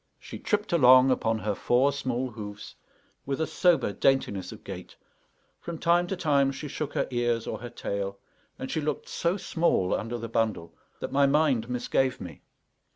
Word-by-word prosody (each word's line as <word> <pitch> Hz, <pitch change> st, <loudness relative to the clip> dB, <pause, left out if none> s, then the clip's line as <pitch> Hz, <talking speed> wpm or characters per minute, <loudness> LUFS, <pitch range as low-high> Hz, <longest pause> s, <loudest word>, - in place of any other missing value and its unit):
She -, -, -9 dB
tripped 210 Hz, -2 st, -1 dB
along 130 Hz, -4 st, +7 dB
upon 115 Hz, -3 st, +1 dB
her 105 Hz, -1 st, -2 dB
four 125 Hz, +7 st, +2 dB
small 130 Hz, -2 st, -2 dB
hoofs 105 Hz, -2 st, -8 dB, 0.5 s
with 135 Hz, +1 st, -3 dB
a 160 Hz, -, +1 dB
sober 175 Hz, -, +2 dB
daintiness 100 Hz, -6 st, +1 dB
of -, -, -11 dB
gait; -, -, -8 dB, 0.6 s
from 170 Hz, -1 st, -6 dB
time 175 Hz, +2 st, +2 dB
to 190 Hz, -, -2 dB
time 140 Hz, -6 st, +2 dB
she 145 Hz, +2 st, -6 dB
shook 145 Hz, +1 st, -4 dB
her -, -, 0 dB
ears 120 Hz, -2 st, 0 dB
or -, -, -4 dB
her 120 Hz, -, -7 dB
tail; 100 Hz, -4 st, -4 dB, 0.4 s
and 130 Hz, -, -5 dB
she 160 Hz, -, -1 dB
looked 150 Hz, -1 st, -3 dB
so 170 Hz, +3 st, -1 dB
small 165 Hz, -, +1 dB
under 115 Hz, +2 st, -2 dB
the 115 Hz, 0 st, -5 dB
bundle 110 Hz, -7 st, -1 dB, 0.3 s
that -, -, -4 dB
my 140 Hz, +1 st, +4 dB
mind 140 Hz, -5 st, +2 dB
misgave 125 Hz, +1 st, 0 dB
me. 85 Hz, -6 st, -9 dB
130 Hz, 175 wpm, -27 LUFS, 115-150 Hz, 0.6 s, along